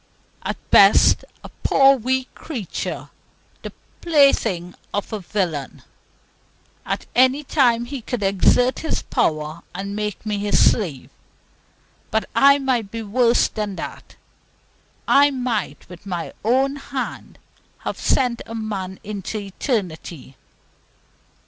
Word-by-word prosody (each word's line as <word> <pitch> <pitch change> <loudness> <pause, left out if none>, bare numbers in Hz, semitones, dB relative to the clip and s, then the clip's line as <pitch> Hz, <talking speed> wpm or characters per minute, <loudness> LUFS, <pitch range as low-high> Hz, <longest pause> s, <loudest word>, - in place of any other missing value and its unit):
At - - -4
best - - +6 0.2
a - - -9
poor 275 0 +5
weak 260 +1 -2
creature, 245 - -6 0.5
the - - -7 0.3
plaything 235 - +2 0.2
of 205 +2 -3
a 215 - -2
villain. 175 -7 -3 1.0
At - - -2
any 260 +4 +4
time 245 -5 +2
he 265 +1 -6
could 235 -1 -4
exert 200 +6 +3
his 320 - -2
power 155 +1 -1
and 200 +2 -4
make 210 -1 -4
me 210 -1 -2
his 205 0 +4
slave. 165 - -4 1.0
But 220 - 0
I 280 +1 +6
might 255 -7 -1
be 230 +2 -5
worse 235 +3 +3
than 210 -2 -4
that. - - -8 0.9
I 285 +1 +6
might, 245 - -3
with 180 +2 -13
my 175 -3 -4
own 265 +5 +2
hand, 275 -1 -6 0.5
have - - -3
sent 250 -3 +1
a 230 - -7
man 195 -4 -4
into 210 0 -5
eternity. 185 - -4
220 Hz, 120 wpm, -21 LUFS, 195-260 Hz, 1.0 s, best